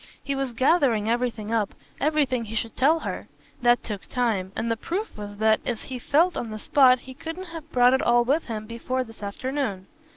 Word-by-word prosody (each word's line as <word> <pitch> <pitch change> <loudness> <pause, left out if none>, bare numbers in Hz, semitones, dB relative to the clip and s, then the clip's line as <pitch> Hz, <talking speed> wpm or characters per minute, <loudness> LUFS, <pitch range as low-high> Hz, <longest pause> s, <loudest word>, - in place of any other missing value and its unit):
He 280 - -2
was 270 -2 -2
gathering 255 -4 +3
everything 230 -2 -1
up, 215 -3 0 0.2
everything 280 -6 +1
he 220 +1 -7
should 225 0 -2
tell 310 +5 +3
her. - - -5 0.3
That 240 0 +4
took 205 -4 -6
time, 220 -7 0
and 230 +1 -1
the - - +2
proof 375 - -4
was 205 -1 -8
that, 220 0 +3
as 235 -3 -3
he 255 -2 -6
felt 330 +8 +3
on 230 - -3
the 215 - -5
spot, 255 +2 +5
he 260 - -10
couldn't 325 +6 -7
have 325 -1 -9
brought 250 -1 +5
it 265 - +3
all 240 0 +4
with 290 +6 +1
him 215 -3 -4
before 235 +3 -2
this 225 -2 -14
afternoon. 205 -1 -3
245 Hz, 205 wpm, -25 LUFS, 220-275 Hz, 0.3 s, spot